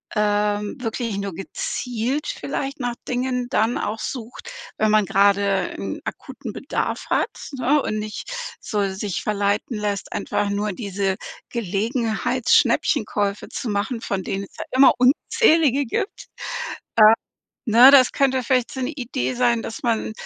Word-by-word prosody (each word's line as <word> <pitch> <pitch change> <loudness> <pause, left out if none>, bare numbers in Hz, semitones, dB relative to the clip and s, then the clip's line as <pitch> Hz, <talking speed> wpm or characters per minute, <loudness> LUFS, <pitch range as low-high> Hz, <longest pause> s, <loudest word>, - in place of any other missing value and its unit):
ähm, 210 0 +1
wirklich 230 -3 -3
nur 200 -2 -3
gezielt 245 - -3
vielleicht 275 +1 -4
nach 245 -1 -1
Dingen 250 0 -1
dann 225 -2 +1
auch 220 +1 -3
sucht, 250 - -6 0.3
wenn 215 - +2
man 215 -2 +4
gerade 200 -1 +2
'n - - -4
akuten - - -7
Bedarf - - -3
hat, - - +2 0.2
ne, 270 +3 +2
und 215 - -2
nicht 215 0 -5 0.3
so 205 -3 -1
sich 195 -1 -3
verleiten 205 +2 0
lässt, 205 -1 -3
einfach 205 - -1
nur 205 0 -1
diese 195 -2 -2 0.3
Gelegenheitsschnäppchenkäufe 225 -1 +1
zu 240 - -4
machen, 215 +3 -2
von 190 -2 -2
denen 195 +2 -3
es - - -13
ja - - -5
immer 265 +1 +7
unzählige 285 - +3
gibt. 310 - -3
Äh. - - -53 1.4
Ne, 245 +5 +9
das 265 -3 +6
könnte 265 -2 +2
vielleicht 250 0 +1
so 265 - -5
'ne 255 - -1
Idee 255 -1 -3
sein, 240 -2 +2
dass 225 - -7
man 225 -2 0
225 Hz, 140 wpm, -22 LUFS, 205-255 Hz, 1.4 s, Ne